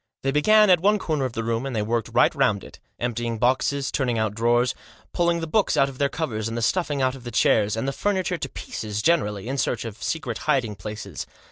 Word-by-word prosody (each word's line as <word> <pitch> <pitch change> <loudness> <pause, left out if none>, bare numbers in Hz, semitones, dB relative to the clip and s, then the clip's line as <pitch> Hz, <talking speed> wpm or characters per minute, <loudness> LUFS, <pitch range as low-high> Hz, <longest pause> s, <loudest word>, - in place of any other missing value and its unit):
They 135 - +1
began 210 +8 +5
at 180 - +6
one 205 +4 +3
corner 155 -8 -1
of 125 - -4
the 115 - -3
room, 115 +1 -1
and 135 -3 -4
they 105 - 0
worked 115 0 -1
right - - +4
round - - +1
it, - - -13 0.2
emptying 120 -1 -2
boxes, 130 +4 +1
turning 125 -5 0
out 110 -2 0
drawers, 120 +2 +2 0.4
pulling 170 -1 +1
the - - -2
books 200 +6 +1
out 135 0 +4
of 130 - -12
their 140 -1 +2
covers, 110 -10 -3
and 115 +1 -4
the 115 - -2
stuffing 145 -1 0
out 130 0 +2
of 135 -2 -11
the 120 - -6
chairs, 110 -2 +2
and 115 - -2
the - - +1
furniture 185 -2 -1
to 135 - -4
pieces 105 -3 -5
generally, 110 - +1
in 135 +2 -2
search 120 -2 -1
of 110 -1 -8
secret 130 -8 -3
hiding 125 -7 +2
places. 100 -3 -7
125 Hz, 235 wpm, -24 LUFS, 115-150 Hz, 0.4 s, at